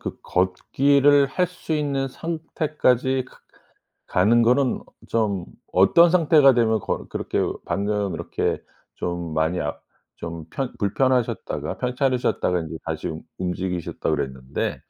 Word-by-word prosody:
그 - - -6
걷기를 140 +10 +3
할 180 +7 0
수 175 -2 -7
있는 140 -3 0
상태까지 150 -5 0
가 - - -19 0.7
가는 110 +6 +4
거는 125 +3 +2 0.3
좀 100 -6 0 0.3
어떤 135 - +6
상태가 155 -6 +5
되면 110 -2 +3
걷 - - -4
그렇게 - - -2 0.2
방금 100 -2 -1
이렇게 - - -2 0.3
좀 85 -2 -4
많이 80 +3 +1
아 - - -3 0.4
좀 85 -1 -7
편 135 +5 -4
불편하셨다가 120 +1 0
편찮으셨다가 125 -7 0
이제 80 0 -7
다시 80 -1 -4
움 80 0 -5 0.2
움직이셨다 90 -1 -3
그랬는데 65 0 -3
115 Hz, 265 characters per minute, -23 LUFS, 90-140 Hz, 0.7 s, 어떤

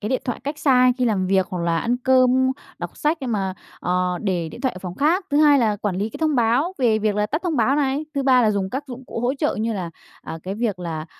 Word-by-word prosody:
cái 210 - -3
điện 260 - -1
thoại 245 - -3
cách 290 +2 -4
xa 255 -3 +4
khi 250 - +1
làm 195 -5 +1
việc, 190 -1 +2
hoặc 180 -2 -3
là 165 -1 +1
ăn 240 +6 0
cơm, 260 0 +3 0.3
đọc - - -7
sách, 310 +2 0
nhưng 250 -3 -3
mà, 195 -3 -1 0.3
ờ, 180 0 0
để 180 -5 -1
điện 195 - -11
thoại 260 -1 0
ở 185 - -8
phòng 180 -1 -7
khác. 330 - +1
Thứ 285 - +1
hai 295 -1 +6
là 215 -4 +1
quản 205 -2 -2
lý 205 +4 -2
cái - - -9
thông 310 -2 +1
báo 245 +8 +2
về 225 -4 +3
việc 215 -1 0
là 210 0 +1
tắt 305 - -3
thông 340 -4 -1
báo 255 +5 +2
này. 285 +1 0
Thứ 280 - 0
ba 255 -2 +4
là 215 - +3
dùng 195 -2 -2
các 275 +3 -4
dụng 255 -1 -9
cụ 230 - -5
hỗ 250 +3 0
trợ 295 +2 -1
như 225 +1 0
là, 180 -5 -4 0.3
à, 165 - -7
cái 190 +2 -4
việc 215 -5 -2
là, 165 -2 -5
235 Hz, 285 wpm, -22 LUFS, 190-270 Hz, 0.3 s, hai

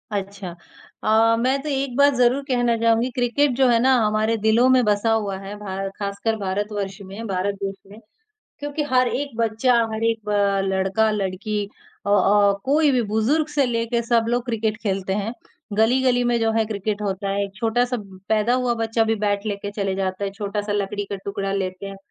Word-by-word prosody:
अच्छा। 200 -2 -4 0.5
अ, 225 +1 +4
मैं 260 +3 +1
तो 305 - -4
एक 270 -2 -2
बात 285 0 +5
ज़रूर 250 +2 +3
कहना 245 -3 +2
चाहूँगी। 230 +2 +2
क्रिकेट 255 +3 +2
जो 265 +1 +4
है 235 -2 +4
ना, 260 +1 +4
हमारे 215 +1 +1
दिलों 220 +3 +3
में 255 -1 +5
बसा 210 +2 +2
हुआ 205 -3 0
है, 195 +1 -7
भार 195 -1 -4
ख़ासकर 200 +2 -2
भारतवर्ष 200 0 -3
में, 200 +4 -8
भारत 195 +1 -1
देश 195 0 -2 0.2
में 210 - -12 0.6
क्योंकि 290 +1 -3
हर 255 -1 +4
एक 280 -2 -4
बच्चा, 230 +2 +2 0.2
हर 220 +1 -4
एक 225 -2 -1
अ, 200 -1 +2
लड़का, 195 +3 +1
लड़की 205 +1 -2 0.4
अ - - 0
अ, 205 0 +4
कोई 295 +2 +3
भी 250 -2 +2
बुजुर्ग 270 +9 +2
से 295 -2 +1
लेके, 235 0 -1
सब 235 -1 +2
लोग 240 0 0
क्रिकेट 225 -3 -1
खेलते 190 -2 -1
हैं। 210 +2 -2 0.4
गली-गली 245 +3 +3
में 240 0 +2
जो 225 0 +2
है 225 0 +2
क्रिकेट 210 0 -3
होता 195 0 -2
है। 200 +1 0
एक 195 -1 -9
छोटा-सा 245 +3 0 0.3
पैदा 220 +2 +2
हुआ 250 -1 +1
बच्चा 225 0 0
भी, 225 0 +1
बैट 205 -1 -1
लेकर 200 -1 -3
चले 195 -2 -1
जाता 190 0 -2
है। 200 - -2
छोटा-सा 205 0 -3
लकड़ी 205 0 -2
का 200 - -2
टुकड़ा 195 0 -3
लेते 190 0 -3
हैं 195 0 -7
220 Hz, 195 wpm, -22 LUFS, 200-240 Hz, 0.6 s, बात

